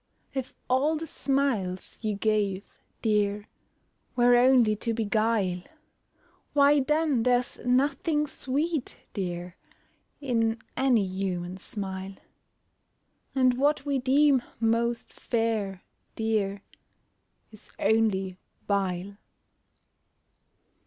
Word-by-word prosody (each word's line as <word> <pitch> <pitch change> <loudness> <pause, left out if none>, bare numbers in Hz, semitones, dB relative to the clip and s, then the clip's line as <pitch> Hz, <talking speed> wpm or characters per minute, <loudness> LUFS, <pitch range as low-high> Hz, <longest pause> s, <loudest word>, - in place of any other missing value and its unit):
If 265 -2 -4
all 275 +5 +2
the 320 +1 -4
smiles 265 - -1
you 215 -2 -1
gave, 200 -2 0 0.4
dear, 210 -2 +1 0.7
Were 245 0 +5
only 245 -3 +5
to 230 +2 -2
beguile, 215 -4 +1 0.9
Why 285 0 +5
then 300 -2 +1
there's 245 +1 +1
nothing 280 +4 +1
sweet, 290 +1 -2
dear, 175 -2 -4 0.6
In 230 -5 0 0.2
any 250 -6 +3
human 185 -1 -3
smile; 190 -1 -5 1.2
And 255 -2 +3
what 290 0 +2
we 280 -2 0
deem 270 +1 +4 0.2
most 230 +1 0
fair, 220 -5 -2 0.3
dear, 205 -3 -1 0.9
Is 215 - -16
only 195 -4 +1 0.3
vile. 195 -1 -1
225 Hz, 90 wpm, -27 LUFS, 200-265 Hz, 1.2 s, Were